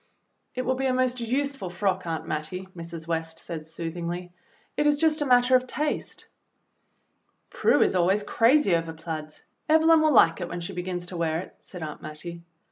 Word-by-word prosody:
"It 255 - -1
will 260 - +2
be 265 +1 -1
a 255 - +1
most 255 -1 +1
useful 260 -3 -2
frock, 185 0 -1
Aunt 165 -1 -3
Mattie," 180 +5 -3
Mrs. 165 -1 -8
West 165 -1 -2
said 160 -2 -7
soothingly; 170 +2 -5 0.4
"it 295 - +2
is 295 0 +4
just 310 0 +2
a 290 - +1
matter 250 0 +5
of 255 0 +2
taste." 300 +3 -2 1.3
"Prue - - +4
is - - +1
always 190 +3 +2
crazy 230 - +4
over 165 -1 -2
plaids. 160 -1 -7 0.3
Evelyn 320 +1 +6
will 310 0 +4
lilce 170 - +5
it 175 - -3
when 175 - -4
she 170 +3 -5
begins 180 0 -4
to 175 0 -7
wear 160 -1 0
it," - - -12
said 180 -3 -9
Aunt 150 -1 -6
Mattie. 170 +3 -8
180 Hz, 185 wpm, -26 LUFS, 165-255 Hz, 1.3 s, Evelyn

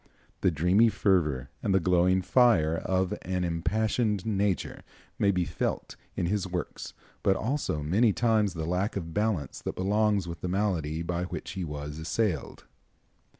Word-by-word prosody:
The - - +3
dreamy 90 +8 +4
fervor 75 - +1
and 95 - +1
the - - +5
glowing 90 +1 +3
fire 95 -9 +4
of 95 +1 0
an 90 0 -2
impassioned 105 +4 0
nature 100 -3 -1 0.4
may 100 - +3
be 90 -3 +1
felt 85 - -3 0.2
in - - -1
his 100 +1 -1
works, 90 -2 -5 0.3
but 95 - +3
also 110 - -2
many 105 +9 +3
times 110 -3 +1
the 80 -1 -3
lack 90 +5 -1
of 85 -4 -4
balance 105 -10 -1
that - - -4
belongs 100 0 +1
with 85 0 -7
the - - -2
malady 85 -5 -1
by 85 +1 -2
which - - -6
he 95 -1 -4
was 75 -1 -6
assailed. 85 - -2
95 Hz, 155 wpm, -28 LUFS, 85-105 Hz, 0.4 s, the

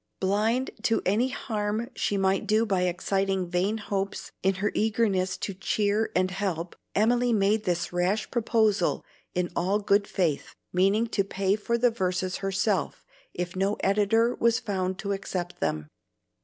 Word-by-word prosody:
Blind 215 +7 +1
to 225 - +1
any 220 +7 +2
harm 215 0 -3
she 205 - 0
might 195 0 +1
do 220 +1 +3
by 190 -4 +1
exciting 190 +1 0
vain 180 +5 0
hopes 200 -2 -3
in 190 +1 +2
her 200 +2 -1
eagerness 205 -4 +1
to 200 - -4
cheer 205 +3 0
and 185 +1 +2
help, 180 -3 -3 0.2
Emily 240 +3 +3
made 210 0 +2
this 175 -1 -1
rash 185 +5 0
proposal 220 -5 +1 0.3
in 180 -1 0
all 190 +4 +1
good 200 0 +2
faith, 170 -7 -1 0.2
meaning 195 +5 +3
to 215 -3 0
pay 195 0 0
for 235 +3 -1
the 245 0 +3
verses 185 -3 -1
herself 195 -2 -1 0.3
if 180 0 -3
no 195 +2 +1
editor 210 +4 +3
was 230 0 +2
found 190 -3 -2
to 200 0 -3
accept 185 -3 -4
them. 75 -2 -1
200 Hz, 155 wpm, -27 LUFS, 185-215 Hz, 0.3 s, do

